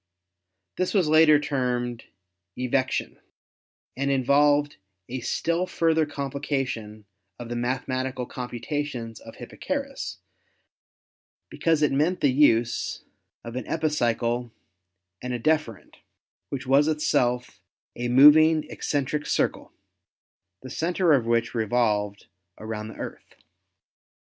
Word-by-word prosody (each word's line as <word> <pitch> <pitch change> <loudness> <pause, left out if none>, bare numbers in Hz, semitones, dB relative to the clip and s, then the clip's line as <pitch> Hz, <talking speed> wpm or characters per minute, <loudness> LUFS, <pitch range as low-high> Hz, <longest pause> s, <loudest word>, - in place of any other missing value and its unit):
This 185 +3 -1
was 185 -5 +3
later 155 -1 +6
termed 125 -4 -2 0.5
"evection" 130 +1 -1 0.8
and 140 +1 -1
involved 145 +2 +3 0.3
a 130 +2 -4
still 170 +8 -1
further 160 -3 +1
complication 135 -7 -4 0.3
of 120 -1 -8
the 120 - -3
mathemati 130 +1 -2
cal 125 - -4
computations 125 -1 -5
of 115 - -12
Hipparchus 275 - -5 1.3
because 160 -2 +1
it 150 - +3
meant 155 +7 +1
the 140 - +4
use 120 -5 +2 0.4
of 115 0 -8
an 130 -3 -5
epicycle 120 -6 -1 0.7
and 125 0 -4
a - - -4
deferent, 155 -6 -1 0.5
which 135 -2 -5
was 140 +3 +4
itself 130 -5 0 0.3
a 120 - -3
moving 150 +5 +7
eccentric 145 +1 -2
circle, - - -1 0.9
the 130 - -8
center 175 +3 +1
of 125 -5 +2
which 115 -1 +1
revolved 105 -3 0 0.3
around 110 0 -6
the 110 - -10
Earth. - - -9
130 Hz, 110 wpm, -25 LUFS, 120-150 Hz, 1.3 s, moving